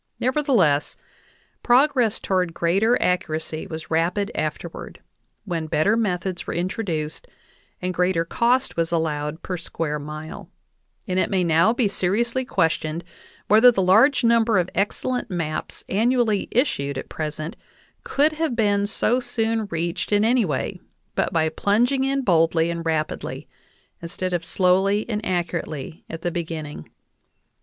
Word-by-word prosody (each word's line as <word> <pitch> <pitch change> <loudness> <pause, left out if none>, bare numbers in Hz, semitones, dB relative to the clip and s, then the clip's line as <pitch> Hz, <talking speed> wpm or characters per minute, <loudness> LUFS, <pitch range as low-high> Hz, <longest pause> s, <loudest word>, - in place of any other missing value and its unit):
Nevertheless, 245 - +2 0.6
progress 250 -3 +3
toward 180 -3 -1
greater 195 +8 +2
ac 180 0 +2
curacy 155 0 -5
was 160 0 -7
rapid 180 +6 +1
afterward, 155 +2 -5 0.5
when 165 -5 -3
better 155 +8 +2
methods 185 -5 -2
were - - -3
intro 185 +6 -2
duced 155 -5 -4 0.6
and 185 0 -1
greater 180 -2 +1
cost 250 +8 +1
was 165 0 0
allowed 155 -1 -2
per 180 - -3
square 150 -2 -3
mile; 155 +2 -8 0.6
and 185 -1 0
it - - +1
may 190 -2 +1
now 170 +5 +4
be 240 -2 +1
seriously 230 +7 0
questioned 165 -5 -1 0.4
whether 220 +4 +7
the 195 -5 0
large 225 +11 +5
number 230 -2 +4
of 180 0 0
excellent 245 +4 -1
maps 165 -4 -4
annually 225 0 +1
issued 140 - 0
at - - -5
present 155 +1 -5 0.5
could 295 +3 +2
have 310 -5 -1
been 205 -3 +2
so 235 +3 +2
soon 225 -3 -1
reached 170 +2 -3
in 205 +1 +3
any 240 -1 +3
way 145 -6 -3 0.3
but - - 0
by 160 -1 +2
plunging 230 - +1
in 275 0 0
boldly 165 -3 +3
and 170 -1 -4
rapidly 155 -1 -2 0.5
instead 180 +2 -4
of 175 -1 -1
slowly 190 +4 +2
and 215 -2 -3
accurately 170 -5 -3
at 165 0 -7
the 175 - 0
beginning. 160 - -5
180 Hz, 140 wpm, -23 LUFS, 165-225 Hz, 0.6 s, whether